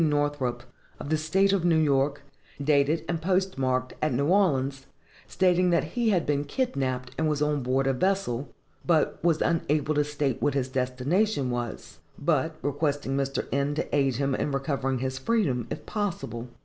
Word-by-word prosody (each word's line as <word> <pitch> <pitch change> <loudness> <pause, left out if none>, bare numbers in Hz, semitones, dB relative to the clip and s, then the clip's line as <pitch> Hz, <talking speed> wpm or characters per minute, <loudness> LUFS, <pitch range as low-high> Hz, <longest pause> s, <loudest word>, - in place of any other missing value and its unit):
Northrop, 145 -5 -1 0.4
of - - -6
the - - +4
State 190 +6 +2
of 195 -4 +1
New 170 -2 +4
York, 145 -2 +1 0.4
dated 150 +2 +2
and 165 -2 -2
postmarked 135 -9 0
at 155 - +1
New 135 +3 +1
Orleans, 135 -8 +1 0.4
stating 180 -1 +2
that 170 -1 +3
he 240 -2 +1
had 180 -6 +2
been 145 -1 0
kidnapped 135 - -2
and 160 -1 +2
was 150 -1 0
on 150 -1 +1
board 130 +2 +1
a 135 - +2
vessel, 145 -5 -1 0.3
but 160 -3 +1
was 165 -2 +3
unable 155 -2 +1
to 150 0 +2
state 145 -3 -2
what 145 - +1
his 135 -2 0
destination 130 - 0
was; 120 -2 -5 0.2
but 155 +1 0
requesting 145 -1 -1
Mr. 135 0 -1
N. 140 +1 0
to 150 - -2
aid 135 -3 +2
him 140 +2 0
in 145 - -1
recovering 135 -1 -1
his 130 +1 -3
freedom, 135 - 0
if 150 - -6
possible. 170 - -3
145 Hz, 170 wpm, -27 LUFS, 135-165 Hz, 0.4 s, the